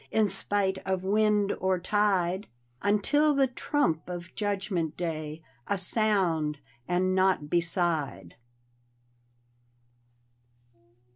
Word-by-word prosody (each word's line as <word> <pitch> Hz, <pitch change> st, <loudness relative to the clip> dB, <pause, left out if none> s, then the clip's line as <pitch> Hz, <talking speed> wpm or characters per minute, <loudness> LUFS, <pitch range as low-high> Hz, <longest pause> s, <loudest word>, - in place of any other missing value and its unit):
In 220 Hz, -1 st, +2 dB
spite 195 Hz, 0 st, +1 dB
of 190 Hz, -1 st, -2 dB
wind 210 Hz, 0 st, +2 dB
or 190 Hz, 0 st, +1 dB
tide. 190 Hz, 0 st, +1 dB, 0.3 s
Until 290 Hz, +9 st, +3 dB
the 275 Hz, -1 st, +4 dB
trump 245 Hz, -, -1 dB
of 175 Hz, 0 st, -7 dB
Judgment 195 Hz, -6 st, -2 dB
Day 155 Hz, -2 st, -4 dB
— -, -, -34 dB
A 200 Hz, -, 0 dB
sound 180 Hz, -6 st, +1 dB, 0.2 s
— 120 Hz, 0 st, -35 dB
and 185 Hz, +1 st, +1 dB
nau^t 185 Hz, -5 st, +2 dB
beside. 165 Hz, -, -1 dB
190 Hz, 100 wpm, -28 LUFS, 170-205 Hz, 0.3 s, the